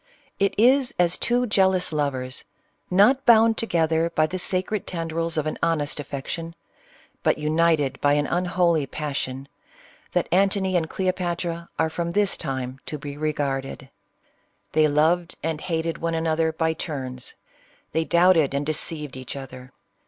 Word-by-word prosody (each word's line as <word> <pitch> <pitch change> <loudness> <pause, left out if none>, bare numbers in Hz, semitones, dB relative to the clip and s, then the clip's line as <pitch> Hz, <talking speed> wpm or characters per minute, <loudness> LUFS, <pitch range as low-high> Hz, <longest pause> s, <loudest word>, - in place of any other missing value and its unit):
It 200 0 +1
is 255 +4 +4
as 175 0 +3
two 245 +1 +1
jealous 190 -5 +2
layers, 135 -3 -2 0.5
not 210 +9 +4
bound 225 -2 +6
together 165 -6 +1
by 155 -2 +2
the 185 +4 -4
sacred 185 +3 -1
tendrils 165 -1 -2
of 155 - 0
an 155 - -3
honest 150 -3 0
affection, 155 +4 -5 0.7
but - - +2
united 155 -3 +1
by 145 0 +4
an 145 0 +2
unholy 175 -3 +1
passion, 135 -3 -4 0.7
that - - +1
Antony 190 0 +2
and 160 -2 +1
Cleopatra 175 -2 -2
are 160 0 +1
from 170 +1 -2
this 205 0 +2
time 130 -3 -4
to 150 - -4
be 145 0 -7
regarded. 140 -3 -3 0.8
They 155 0 +4
loved 165 +4 +2
and 160 -1 -2
hated 165 -1 -2
one 165 0 -1
another 160 0 +1
by 160 0 0
turns, 130 -6 -5 0.3
— - - -34
they 160 - +1
doubted 170 -4 +4
and 140 +1 -1
deceived 150 -2 -1
each 130 0 -7
other. 130 -1 -9
160 Hz, 145 wpm, -24 LUFS, 145-180 Hz, 0.8 s, bound